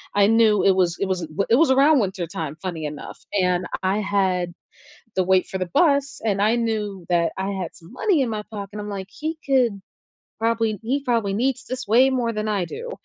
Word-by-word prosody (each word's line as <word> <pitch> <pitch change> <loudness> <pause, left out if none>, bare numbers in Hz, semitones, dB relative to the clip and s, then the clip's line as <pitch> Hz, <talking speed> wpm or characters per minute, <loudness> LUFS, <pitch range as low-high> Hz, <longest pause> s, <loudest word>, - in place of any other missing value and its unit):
I 200 0 +5
knew 220 -2 +4
it 195 - +6
was 175 -2 +1
it 195 - 0
was 185 -2 -1
th 160 - -6 0.2
it 230 - +6
was 305 -1 +4
around 280 +2 +5
wintertime, 175 -6 -3
funny 170 -4 -4
enough, 150 0 -7 0.2
and 180 0 +1 0.2
I 195 +3 +1
had 190 -3 0 0.6
the 185 - +2
wait 185 0 +3
for 190 - -4
the 185 - -2
bus 280 -4 +2
and 200 -2 +1
I 220 +3 +3
knew 210 -6 -2
that 170 -1 +2
I 190 +1 -2
had 180 - -5
some 170 +5 -15
money 355 +2 +1
in 245 - -1
my 210 -1 -3
pocket, 205 -1 -7
I'm 210 - -6
like, 195 -1 -5
"He 315 +1 -5
could 245 -7 +2 0.6
probably 225 -2 +1
he 270 +5 -1
probably 225 -5 0
needs 250 +2 0
this 255 -3 -5
way 255 +4 +5
more 240 -3 0
than 215 0 -3
I 200 -4 0
do." 485 +2 -7
210 Hz, 210 wpm, -23 LUFS, 185-245 Hz, 0.6 s, it